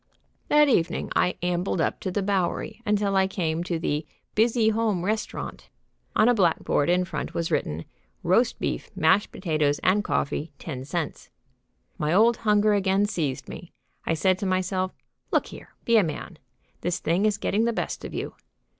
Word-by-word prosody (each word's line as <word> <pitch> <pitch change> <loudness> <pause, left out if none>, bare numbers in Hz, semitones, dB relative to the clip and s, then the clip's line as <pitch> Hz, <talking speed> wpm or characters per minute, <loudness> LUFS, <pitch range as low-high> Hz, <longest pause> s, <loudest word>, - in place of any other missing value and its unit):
That 295 0 +5
evening 175 -11 +1
I 180 - +2
ambled 180 +1 0
up - - 0
the 195 +1 -2
Bowery 195 +2 -1
until 205 -1 +1
I 190 0 +4
came 170 -3 -1
to 175 -2 -1
the 150 -1 -1 0.3
Busy 225 0 +3
Home 215 -5 0
Restaurant. 215 +2 -3 0.5
On 215 - +5
a 245 - +6
black 180 -7 +2
board 145 - +1
in 180 +1 +3
front 185 - -5
was 165 -1 -1
written, 80 +2 -1 0.4
"Roast - - +3
Beef, - - -3
Mashed 160 +6 +3
Potatoes 155 -5 0
and 200 +3 +3
Coffee, 145 -1 -2
10 130 -4 -6
Cents." 165 +1 -4 0.7
My 150 0 0
old 225 +4 +5
hunger 210 -1 +3
again 195 0 +2
seized 155 -10 -2
me. 175 - -9 0.3
I 165 - 0
said 185 +3 +2
to 200 - -2
myself: 185 0 0 0.4
"Look - - +2
here! - - -12
Be 235 -1 +5
a 210 - +5
man! 155 -4 -5 0.4
This 175 0 -1
thing 180 +6 +1
is 210 -1 +1
getting 215 +1 +1
the 235 - +2
best 225 - -3
of - - -6
you." - - -4
185 Hz, 170 wpm, -26 LUFS, 165-210 Hz, 0.7 s, a